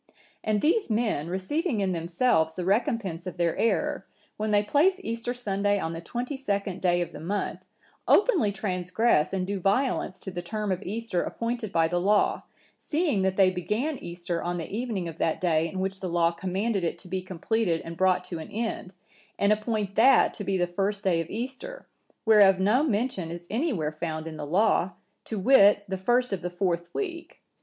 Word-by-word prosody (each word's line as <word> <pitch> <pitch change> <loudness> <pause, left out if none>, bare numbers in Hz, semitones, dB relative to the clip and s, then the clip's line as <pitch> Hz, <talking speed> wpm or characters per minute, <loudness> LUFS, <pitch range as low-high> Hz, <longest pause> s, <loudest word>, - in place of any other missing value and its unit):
"And 215 -1 +1
these 375 - +2
men, 215 -9 0
receiving 220 - -1
in 195 -2 +1
themselves 165 -1 +1
the 180 - -3
recompense 195 -4 0
of 180 -1 -6
their 170 -2 +1
error, 230 - 0 0.3
when 215 +1 -2
they 205 -1 +3
place 335 - +3
Easter 230 -1 -3
Sunday 205 -4 0
on 165 -4 -3
the 165 - -6
twenty 245 - -4
second 200 -7 -2
day 175 -1 +2
of 175 - -3
the - - -9
month, 195 +6 -3 0.5
openly 375 - +4
transgress 185 -2 +1
and 190 -1 -1
do 200 +1 -3
violence 195 -1 0
to 190 - -6
the 175 -1 -4
term 210 +3 -3
of 185 0 -1
Easter 210 -2 -2
appointed 230 -2 -3
by 165 -2 +3
the 175 +1 -1
Law, 205 +3 +2 0.4
seeing 300 - 0
that 190 0 0
they 190 -2 +5
begin 220 - -2
Easter 170 0 -4
on 175 0 -2
the 170 +4 -5
evening 220 -7 -2
of 165 -1 -8
that 160 - 0
day 165 -2 +1
in 190 - -5
which 190 0 -2
the 185 - -4
Law 170 -1 +2
commanded 190 +4 -2
it 165 - -1
to 185 - -13
be 185 +1 -2
completed 185 0 -1
and 165 0 -6
brought 185 +1 +2
to 170 - -5
an 160 - -8
end; 215 -4 -4 0.4
and 200 +1 +4
appoint 215 -2 -2
that 255 +5 +5
to 205 - -6
be 195 0 0
the 175 - +2
first 195 +3 -2
day 175 -4 +2
of 165 - -7
Easter, 265 - -6 0.4
whereof 205 -4 +6
no 210 +8 +3
mention 225 - -1
is 170 +1 -7
any 290 +9 0
where 155 - -1
found 155 0 -4
in 160 - -6
the 150 -1 -5
Law, 185 +1 +2 0.3
to 220 - -4
wit, 205 -2 +6
the 190 - -2
first 240 +5 +1
of 190 - -2
the 180 - -3
fourth 175 -1 -2
week. 345 - -5
195 Hz, 200 wpm, -27 LUFS, 175-230 Hz, 0.5 s, whereof